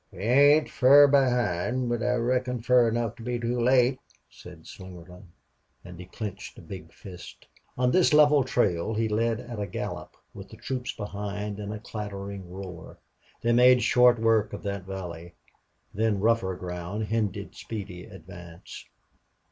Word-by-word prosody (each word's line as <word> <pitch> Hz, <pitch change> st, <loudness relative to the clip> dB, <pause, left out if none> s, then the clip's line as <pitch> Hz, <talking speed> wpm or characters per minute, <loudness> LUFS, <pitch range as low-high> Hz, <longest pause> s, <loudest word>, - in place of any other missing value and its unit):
"We -, -, -15 dB
ain't 145 Hz, +6 st, +5 dB
fur 140 Hz, +3 st, +6 dB
behind, 125 Hz, -4 st, +1 dB
but 120 Hz, -1 st, -2 dB
I 125 Hz, +1 st, +1 dB
reckon 125 Hz, +1 st, -1 dB
fur 125 Hz, -1 st, +4 dB
enough 115 Hz, -1 st, -2 dB
to -, -, -12 dB
be 120 Hz, +1 st, -3 dB
too 120 Hz, +1 st, -2 dB
late," 125 Hz, +1 st, +3 dB, 0.3 s
said 80 Hz, +6 st, -14 dB
Slingerland. 90 Hz, 0 st, -12 dB, 0.6 s
And 90 Hz, -1 st, -11 dB
he 90 Hz, -, -10 dB
clenched 100 Hz, 0 st, -7 dB
a -, -, -11 dB
big 90 Hz, -5 st, -10 dB
fist. 90 Hz, -3 st, -12 dB, 0.3 s
On 125 Hz, 0 st, +2 dB
this 185 Hz, +2 st, +3 dB
level 150 Hz, -2 st, +5 dB
trail 110 Hz, -5 st, 0 dB
he 110 Hz, +1 st, 0 dB
led 115 Hz, +1 st, 0 dB
at 120 Hz, -3 st, -8 dB
a 100 Hz, -, -3 dB
gallop, 90 Hz, -, -6 dB, 0.2 s
with -, -, -11 dB
the -, -, -13 dB
troops 125 Hz, -2 st, -4 dB
behind 105 Hz, 0 st, -6 dB
in 100 Hz, -1 st, -6 dB
the 105 Hz, -, -5 dB
clattering 100 Hz, -4 st, -7 dB
roar. 90 Hz, -2 st, -9 dB, 0.5 s
They 120 Hz, -, +2 dB
made 125 Hz, +1 st, +5 dB
short 125 Hz, -1 st, +5 dB
work 110 Hz, -1 st, +1 dB
of -, -, -7 dB
that 100 Hz, -2 st, -4 dB
valley. 85 Hz, -3 st, -8 dB, 0.6 s
Then 110 Hz, -1 st, 0 dB
rougher 110 Hz, -3 st, +1 dB
ground 90 Hz, +4 st, -5 dB
hindered 105 Hz, -3 st, -2 dB
speedy 100 Hz, -5 st, -8 dB
advance. 85 Hz, -1 st, -12 dB
110 Hz, 155 wpm, -26 LUFS, 95-125 Hz, 0.6 s, fur